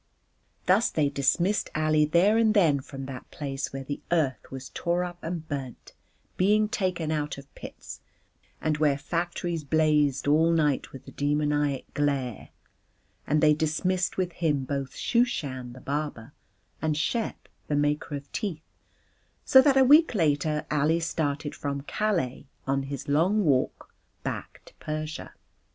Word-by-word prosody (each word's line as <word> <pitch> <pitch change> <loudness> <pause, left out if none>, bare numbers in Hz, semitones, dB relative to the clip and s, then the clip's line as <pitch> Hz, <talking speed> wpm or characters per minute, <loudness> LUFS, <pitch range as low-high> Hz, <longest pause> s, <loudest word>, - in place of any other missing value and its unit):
Thus 195 +6 +4
they 150 -3 +1
dismissed 160 +9 +1
Ali 155 0 +3
there 175 +8 +4
and 220 -1 +3
then 160 -8 +4
from 135 0 -8
that 130 -1 -8
place 140 -2 -4
where 135 0 -5
the 140 +2 -5
earth 155 -7 0
was 135 0 -8
torn 175 +1 -1
up 175 0 -8
and 165 -1 -5
burnt, 135 -5 -6 0.4
being 210 +3 +3
taken 180 -6 -1
out 150 -2 -2
of 140 0 -13
pits, - - -10 0.6
and 155 -1 -1
where 145 -3 +3
factories 170 +1 -2
blazed 150 -2 +2
all 155 +3 +4
night 150 -4 +1
with 135 0 -12
a - - -9
demoniac 145 -1 0
glare; 140 -6 -1 0.8
and 150 +1 +2
they 150 0 +7
dismissed 175 +4 0
with 185 -2 0
him 150 -6 0
both 140 0 -4
Shooshan, 140 - -1
the 130 - -11
barber, 145 -3 -4 0.5
and 155 -2 0
Shep, 225 +8 -2 0.2
the 150 - 0
maker 145 +1 0
of 140 0 -8
teeth: 180 -8 -3 0.8
so 265 - +8
that 270 0 +4
a 265 - +7
week 295 +1 +6
later 150 -3 +1
Ali 150 +3 +2
started 150 -3 -2
from 140 -1 -4
Calais 160 -6 -1 0.2
on 135 0 +1
his 135 -1 -6
long 175 +8 +2
walk 135 -4 0 0.3
back - - -5
to - - -16
Persia. 155 0 -5
150 Hz, 150 wpm, -27 LUFS, 140-175 Hz, 0.8 s, so